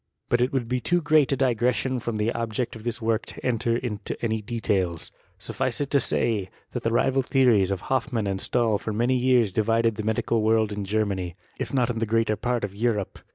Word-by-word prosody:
B«t 120 0 +3
it 125 - 0
would 130 -4 -1
be 125 +1 0
too 175 +7 +1
great 150 -3 +3
a 135 - +1
digression 125 +1 +1
from 115 -1 -3
the 105 +2 +1
object: 115 +1 -3
of 110 - -10
this 120 0 -3
work 115 0 +1
to - - -8
enter 115 -1 +1
into 105 -5 -4
any 110 -1 -1
details; 100 -7 -1 0.3
suffice - - -3
it 145 -1 -2
to 140 - +4
Bay, 105 -5 0 0.2
that - - -4
the 115 - 0
rival 135 +3 +2
theories 125 -7 +3
of 100 -3 -2
Hoffmann 130 -4 -1
and 95 -1 -2
Stahl 115 -4 +1
(or 110 - 0
many 120 +4 +1
years 125 -4 +3
divided 115 +2 +1
the 110 - -3
medical 110 +1 0
world 110 0 +2
in 100 -1 -4
Germany, 95 -4 -1 0.2
if - - -3
not 125 -2 +1
m 115 - -4
the 115 - -1
greater 115 0 +1
part 120 +1 -1
of 100 -1 -3
Europe. 105 -2 -1
115 Hz, 215 wpm, -25 LUFS, 105-125 Hz, 0.3 s, to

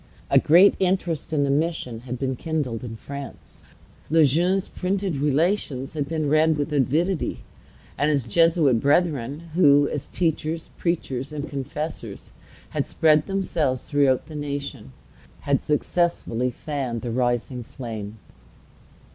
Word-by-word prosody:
A - - +7
great 180 +6 +6
interest 180 -5 0
in 150 -2 +2
the 140 - +1
mission 145 -6 -1
had 125 +1 -6
been 130 0 -2
kindled 135 -6 -3
in 115 -2 -6
France. 140 +3 -9 0.5
Le 160 0 +5
Jeune's 180 +7 +2
printed 190 -3 -2
Relations 145 -1 0
had 145 -3 -2
been 155 -2 -1
read 155 +1 +3
with 145 +1 -2
avidity; 155 +6 0 0.6
and 145 - +3
his 145 -4 +1
Jesuit 155 - +3
brethren, 145 +1 0
who, 145 -4 +5
as 145 -1 -4
teachers, 165 -1 -2
preachers, 140 -6 -2
and 150 0 -5
confessors, 140 -5 -5 0.4
had - - -2
spread 155 -1 +3
themselves 165 -9 -1
through 140 -3 +3
the 155 - -12
nation, 140 - -5 0.5
had 140 -1 0
successfully 150 -6 0
fanned 125 -3 -4
the 120 - -3
rising 120 +1 -1
flame. 110 -4 -7
145 Hz, 130 wpm, -24 LUFS, 130-165 Hz, 0.6 s, A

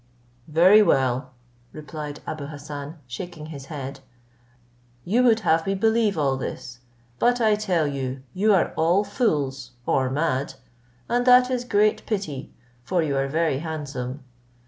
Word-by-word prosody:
"Very 180 +7 +6
well," 130 -8 +2 0.4
replied 150 -1 -7
Abou 150 -2 -5
Hassan, 145 +1 -8
shaking 155 +5 -7
his 140 -2 -9
head, 135 -2 -7 1.1
"you 225 +8 +2
would 230 -3 +4
have 165 -2 +2
me 195 - +1
believe 220 0 +2
all 135 -3 +1
this; 125 -1 -6 0.4
but 245 +1 +3
I 220 -2 +4
tell 190 -7 +1
you, 135 -2 -4
you 210 +3 +2
are 190 -4 +2
all 170 +5 +3
fools, 145 - -1
or 130 -1 +1
mad, 135 -2 -1 0.5
and 245 +1 +1
that 250 0 +6
is 250 -1 -1
great 215 -2 +2
pity, 175 - -3 0.3
for 175 +4 0
you 145 -3 -1
are 135 0 +1
very 155 -1 0
handsome. 145 -4 -5
155 Hz, 145 wpm, -24 LUFS, 135-205 Hz, 1.1 s, Very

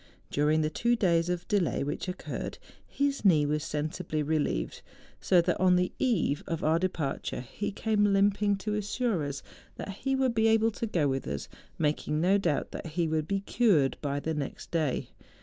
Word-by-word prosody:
During 150 +2 +2
the 155 0 0
two 235 +8 +2
days 170 -5 +2
of 175 -1 -2
delay 200 -10 +1
which 145 +6 -3
occurred, 180 +1 -5 0.3
his 280 -3 -1
knee 160 -7 +5
was 150 +1 0
sensibly 155 0 -2
re¬ 155 +1 +1
lieved, - - -3 0.4
so 180 -2 +4
that - - 0
on 185 -1 +5
the/eve 180 - 0
of 165 - -3
our 160 +2 +3
departure, 165 -9 -2
he 205 - -4
came 210 0 +1
limping 200 +1 +3
to 210 +2 -3
assure 210 -3 -1
us 140 -1 -4 0.3
that - - -6
he 270 +3 0
would 265 -2 +1
be 225 -1 +3
able 225 0 +4
to 230 - -4
go 165 -8 +1
with 135 -1 -2
us, 70 -1 -4 0.3
making 150 0 0
no 190 +5 +3
doubt 160 -7 0
tliat - - -6
he 165 +1 -1
would 155 -1 -1
be 195 -1 0
cured 195 - +3
by 145 -1 -1
the 160 +2 -2
next 145 -3 -5
day. 155 -6 0
170 Hz, 185 wpm, -29 LUFS, 150-205 Hz, 0.4 s, knee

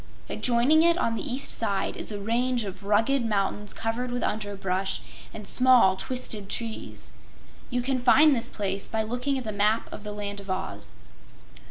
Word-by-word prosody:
Adjoining 250 +6 +3
it 340 +1 +4
on 230 -9 0
the 225 - -3
east 270 -1 -2
side 200 -4 -1
is - - -4
a 205 - -3
range 240 +3 0
of 195 -1 -7
rugged 225 +6 +2
mountains 205 -1 -1
covered 230 +3 -3
with 245 0 -2
underbrush 195 -2 -2 0.3
and 210 -2 -9
small 250 -7 +6
twisted 215 -3 -2
trees. 230 0 -5 0.6
You 245 -1 -1
can 260 0 0
find 275 +4 +6
this 230 - -1
place 195 -2 -2
by 220 -1 -1
looking 250 +5 -1
at 260 - -4
the 220 - -4
Map 210 +2 +1
of - - -8
the 210 - -5
Land 205 -1 -5
of 200 -1 -11
Oz. 190 +1 -4
225 Hz, 175 wpm, -26 LUFS, 200-250 Hz, 0.6 s, small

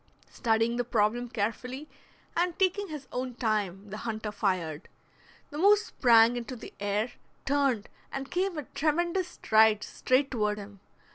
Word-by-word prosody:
Studying 225 0 +1
the 245 - +1
problem 240 +1 +1
carefully, 245 +6 -3 0.5
and 345 0 0
taking 390 +2 +1
his 300 -5 -7
own 250 -1 -3
time, 205 -4 -1
the 210 - -5
hunter 220 -1 -4
fired. 185 -6 -2 0.6
The 295 - -5
moose 410 +4 +5
sprang 235 - +5
into 245 +1 -5
the 230 - -10
air, 205 +3 -1 0.3
turned, 270 -6 +1 0.2
and 270 0 -5
came 370 0 0
with 300 -3 -7
tremendous 345 +4 +1
strides 220 - +3
straight 265 +2 +1
toward 210 -4 0
him. 200 -1 -10
240 Hz, 145 wpm, -29 LUFS, 210-285 Hz, 0.6 s, moose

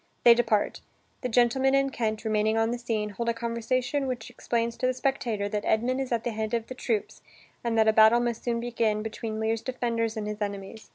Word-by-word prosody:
They 240 - +9
depart. 225 -3 +1 0.4
The 250 - -2
gentleman 250 +3 +3
and 275 -1 +1
Kent, 220 -1 -2
remaining 215 0 +1
on 225 +1 +2
the 240 - -3
scene, 220 -3 -2
hold 235 +3 -2
a 230 - 0
conversation 245 +4 -1
which 245 -2 -4
explains 235 -1 -1
to 255 - 0
the 255 - 0
spectator 235 -6 -1
that 210 0 -2
Edmund 250 +4 +1
is 265 - -4
at 230 -1 0
the 240 - -1
head 220 +1 -2
of 230 -1 -2
the 255 - -7
troops 230 -4 -2 0.4
and 230 -1 0
that 220 0 +4
a 220 - +5
battle 220 +2 +7
must 240 -1 -2
soon 235 -1 0
begin 230 -3 0
between 220 0 -5
Lear's 220 0 0
defenders 230 -3 -2
and 215 - -3
his 210 0 -5
enemies. 200 +1 -5
230 Hz, 220 wpm, -27 LUFS, 220-240 Hz, 0.4 s, They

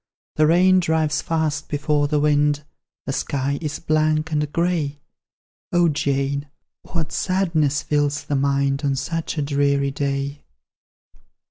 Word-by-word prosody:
The 155 0 +5
rain 185 +3 +5
drives 160 -3 +1
fast 155 -2 -1
before 150 0 +1
the 150 0 +1
wind, 145 0 +2 0.4
The 135 - -2
sky 140 +1 -1
is 155 -2 -3
blank 155 0 +1
and 150 -1 0
grey; 165 -4 0 0.7
O 175 -1 +4
Jane, 140 0 -1 0.3
what 160 -3 -4
sadness 165 -6 +1
fills 145 -1 0
the 145 - -2
mind 140 0 +1
On 140 -1 +1
such 165 +4 -3
a 150 - +1
dreary 140 -1 +1
day!" 140 +1 -2
150 Hz, 130 wpm, -22 LUFS, 140-160 Hz, 0.7 s, The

